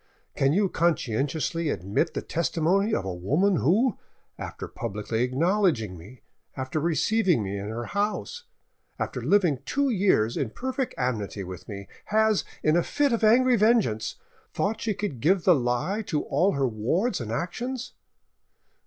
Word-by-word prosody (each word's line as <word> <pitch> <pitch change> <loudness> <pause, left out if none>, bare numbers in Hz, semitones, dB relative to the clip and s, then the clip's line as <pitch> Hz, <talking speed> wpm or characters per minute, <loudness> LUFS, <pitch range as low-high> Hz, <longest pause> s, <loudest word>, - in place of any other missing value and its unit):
Can 135 0 +2
you 195 +5 +3
conscientiously 160 +1 0
admit 100 - -1
the - - -2
testimony 170 - +1
of 95 - 0
a 95 - -3
woman 150 - +1
who, 210 - +2 0.4
after - - -7
publicly 105 +3 -3
acknowledging 135 - +1
me, 100 +9 -13 0.3
after 130 +4 -2
receiving 170 - +2
me 100 0 -4
in 100 +1 -5
her 115 +2 -4
house, 210 - -2 0.5
after - - -3
living 180 -10 +3
two 280 -1 0
years 185 - +2
in 130 - -1
perfect 260 - -3
amity 110 -6 -2
with 90 +2 -9
me, 100 -1 -7 0.2
has, 220 -1 +2 0.2
in 155 +1 +3
a 175 - +4
fit 285 +6 +1
of 230 - -1
angry 245 +3 +5
vengeance, 210 - +2 0.4
thought 215 +3 -1
she 215 -3 -1
could 200 - -4
give 175 +7 +2
the 180 - +6
lie 130 - 0
to 150 -4 -1
all 195 +3 +2
her 135 -2 +1
wards 130 - 0
and 110 -2 -5
actions? 240 - -4
165 Hz, 155 wpm, -26 LUFS, -, 0.5 s, the